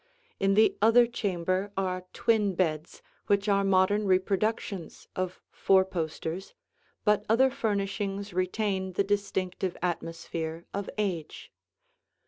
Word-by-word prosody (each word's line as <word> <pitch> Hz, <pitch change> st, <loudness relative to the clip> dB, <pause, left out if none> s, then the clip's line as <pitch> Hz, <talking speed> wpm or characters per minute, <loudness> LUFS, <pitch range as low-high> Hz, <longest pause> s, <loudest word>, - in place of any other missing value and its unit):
In 195 Hz, 0 st, +3 dB
the 220 Hz, +1 st, +5 dB
other 230 Hz, +3 st, +6 dB
chamber 190 Hz, -4 st, -1 dB
are 185 Hz, -1 st, -2 dB
twin 210 Hz, -4 st, +1 dB
beds 160 Hz, -3 st, -2 dB, 0.2 s
which 200 Hz, 0 st, +2 dB
are 200 Hz, -1 st, +3 dB
modern 195 Hz, +2 st, +3 dB
reproductions 190 Hz, 0 st, -1 dB
of 185 Hz, 0 st, -3 dB
four 190 Hz, -1 st, +4 dB
posters, 170 Hz, 0 st, -4 dB, 0.5 s
but 210 Hz, -1 st, +3 dB
other 260 Hz, +4 st, +4 dB
furnishings 200 Hz, -3 st, -2 dB
retain 190 Hz, +1 st, -1 dB
the 200 Hz, -, +2 dB
distinctive 195 Hz, -2 st, -2 dB
atmosphere 165 Hz, -1 st, -3 dB
of 200 Hz, 0 st, -3 dB
age. 180 Hz, -7 st, -3 dB
195 Hz, 110 wpm, -28 LUFS, 185-205 Hz, 0.5 s, other